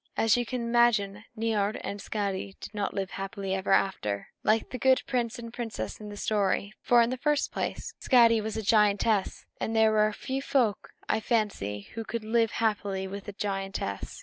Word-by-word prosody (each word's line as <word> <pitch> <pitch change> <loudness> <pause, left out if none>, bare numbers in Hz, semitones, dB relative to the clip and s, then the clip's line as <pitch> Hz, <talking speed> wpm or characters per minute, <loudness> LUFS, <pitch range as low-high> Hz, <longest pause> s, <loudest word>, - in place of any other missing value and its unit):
As 225 -1 +4
you 245 -1 -1
can 250 0 -3
imagine, 230 -3 +2
Niörd 215 -2 0
and 200 - -4
Skadi 195 -1 -3
did - - -9
not 205 -2 -2
live 195 -1 -2
happily 195 0 -4
ever 190 0 -1
after, 105 - +1
like 220 +1 +2
the 255 - -5
good 260 +1 +4
prince 240 -1 -1
and 230 -1 -8
princess 235 -3 -5
in 210 -1 -8
the 205 - -8
story 200 -1 0
book. - - -33
For, 240 -1 +5
in 230 - 0
the 255 - -2
first 295 +2 +1
place, - - -4
Skadi 230 -3 +5
was 220 +1 -4
a 220 - -2
giantess; 210 -1 +2
and 225 - -2
there 220 -1 +4
are 215 0 +4
few 265 +5 -4
folk, 245 -7 +1 0.2
I - - +2
fancy, 210 - -1
who 225 - -4
could 220 +1 -4
live 225 0 +1
happily 205 -3 -1
with 200 +2 -7
a 205 - -5
giantess. 195 - -4
215 Hz, 195 wpm, -28 LUFS, 200-230 Hz, 0.2 s, For